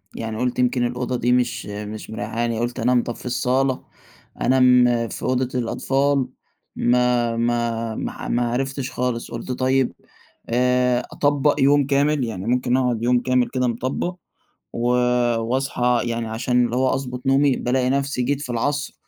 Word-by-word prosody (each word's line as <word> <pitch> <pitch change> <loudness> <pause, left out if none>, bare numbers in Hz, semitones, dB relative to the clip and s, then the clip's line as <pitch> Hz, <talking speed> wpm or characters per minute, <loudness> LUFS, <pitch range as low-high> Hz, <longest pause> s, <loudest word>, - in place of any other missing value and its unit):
يعني 110 -1 -4
قلت 125 +1 -1
يمكن 125 0 +2
الأوضة 125 +1 -2
دي 120 0 +1
مش 125 -1 +1
مش 105 +1 -7
مريحاني 110 +1 -5
يعني 110 - -3
قلت 120 +2 -2
أنام 120 +1 +2
طب 120 - -5
في - - -13
الصالة، 130 +1 0 0.6
أنام 125 -1 +5 0.3
في - - -7
أوضة 130 0 0
الأطفال، 135 +3 0 0.5
ما 120 -1 +2
ما 115 -1 -1
ما - - -5
ما 120 0 0
عرفتش 135 +1 -2
خالص، 125 -2 -3
قلت 115 +2 -5
طيب 130 0 +1 0.6
آآ، 125 +1 +2
أطبق 145 0 +2
يوم 140 +1 +4
كامل 145 0 +2
يعني 110 -5 -4
ممكن 125 +1 +1
أقعد 125 -3 0
يوم 125 +1 +3
كامل 125 0 +1
كده 130 -1 0
مطبق، 130 +9 -2 0.6
و 120 +1 -1 0.5
وأصحى 125 0 0
يعني 115 -1 -2
عشان 125 +2 +1
اللي 120 0 -3
هو 130 0 +2
أضبط 125 -1 -4
نومي، 135 0 +4
بالاقي 125 +1 0
نفسي 140 -1 0
جيت 140 +3 -1
في 145 - -6
العصر 145 +5 -1
125 Hz, 155 wpm, -22 LUFS, 120-130 Hz, 0.6 s, أنام